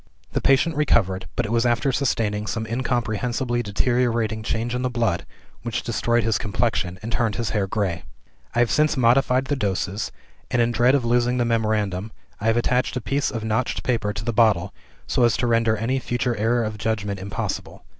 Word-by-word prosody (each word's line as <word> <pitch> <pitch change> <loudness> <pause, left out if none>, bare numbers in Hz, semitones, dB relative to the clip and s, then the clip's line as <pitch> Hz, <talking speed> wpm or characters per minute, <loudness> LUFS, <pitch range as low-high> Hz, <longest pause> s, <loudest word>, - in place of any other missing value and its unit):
"The - - 0
patient 140 +4 +3
recovered 95 -11 +1
but 120 - 0
it 110 - -4
was 115 0 +2
after 120 +3 +2
sustaining 110 -6 0
some 110 +2 -2
incomprehensibly 120 0 -1
deteriorating 115 0 0
change 115 +2 -2
in 125 - -1
the 125 - 0
blood, 115 -7 -1 0.3
which 115 -2 -3
destroyed 120 +1 +1
his 110 0 +1
complexion, 100 -3 -1
and 115 - -4
turned 115 -3 0
his 115 -3 -2
hair 100 -3 0
gray. 95 -5 -2 0.5
I - - +2
have 120 - +2
since 150 -1 +2
modified 130 +1 +3
the 145 - 0
doses; 100 -3 -2 0.4
and 125 - 0
in 120 0 +3
dread 120 +3 +4
of 130 -4 0
losing 120 +1 +2
the 120 - +1
memorandum, 110 -3 0 0.3
I 110 - -2
have 115 +1 +3
attached 125 +1 +1
a - - 0
piece 140 +5 0
of 115 -2 -4
notched 110 +3 -1
paper 115 -4 0
to 105 +1 -6
the 120 - -1
bottle, 105 -5 +3 0.3
so 125 - +1
as 120 -3 +3
to - - 0
render 115 -2 +2
any 125 +5 0
future 120 -1 -1
error 115 +3 +1
of 110 -1 -4
judgment 100 -3 -2
impossible. 95 -2 -5
115 Hz, 195 wpm, -23 LUFS, 105-120 Hz, 0.5 s, dread